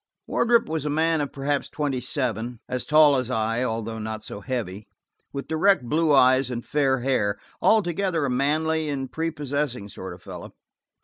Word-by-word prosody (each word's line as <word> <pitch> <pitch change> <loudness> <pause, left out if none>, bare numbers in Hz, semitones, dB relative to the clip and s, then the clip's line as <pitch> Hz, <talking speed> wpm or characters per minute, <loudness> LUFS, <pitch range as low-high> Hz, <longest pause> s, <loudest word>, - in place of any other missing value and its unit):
Wardrop 235 0 +2
was 160 -2 -2
a 150 - -2
man 160 +1 +2
of 145 - -3
perhaps 140 +1 -2
twenty 145 -4 -2
seven, 125 -3 -2
as 125 -1 -3
tall 150 -2 +6
as 125 -1 -2
I, 115 0 0
although 115 -2 -3
not 110 0 -5
so 100 - -7
heavy, 105 -4 -4 0.4
with 140 0 -5
direct 160 +1 +3
blue 155 +5 +1
eyes 130 -1 +5
and 120 -1 -5
fair 135 -3 +1
hair; 120 -6 +1 0.2
altogether 185 -5 +2
a - - -1
manly 155 +4 +1
and 135 -3 -3
prepossessing 145 -8 -3
sort - - -7
of - - -19
fellow. - - -9
135 Hz, 170 wpm, -25 LUFS, 120-155 Hz, 0.4 s, tall